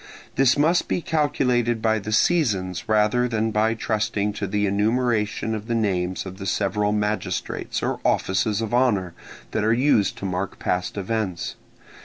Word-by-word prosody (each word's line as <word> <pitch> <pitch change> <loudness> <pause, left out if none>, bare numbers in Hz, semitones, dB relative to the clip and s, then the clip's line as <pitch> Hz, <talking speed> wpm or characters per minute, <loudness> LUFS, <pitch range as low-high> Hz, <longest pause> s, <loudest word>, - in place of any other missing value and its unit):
This 135 +1 +4
must 165 +4 +3
be - - 0
calculated 130 -8 +1
by 110 0 +1
the 105 +1 -6
seasons 105 - +1
rather 110 +3 +3
than 110 -1 -1
by 110 +1 +2
trusting 105 -2 -1
to 100 -1 -3
the 105 +1 0
enumeration 110 +1 0
of 110 0 -5
the 120 - 0
names 95 -5 -1
of 95 +1 -8
the 95 - -5
several 105 +2 0
magistrates 105 -3 -2
or - - -1
offices 100 +3 +1
of 115 0 -3
honour 105 -9 +2 0.4
that 105 - -1
are 110 - +3
used 115 -5 +2
to - - -6
mark 95 +1 -3
past 90 +2 -2
events. 100 -3 -2
105 Hz, 160 wpm, -23 LUFS, 100-120 Hz, 0.4 s, This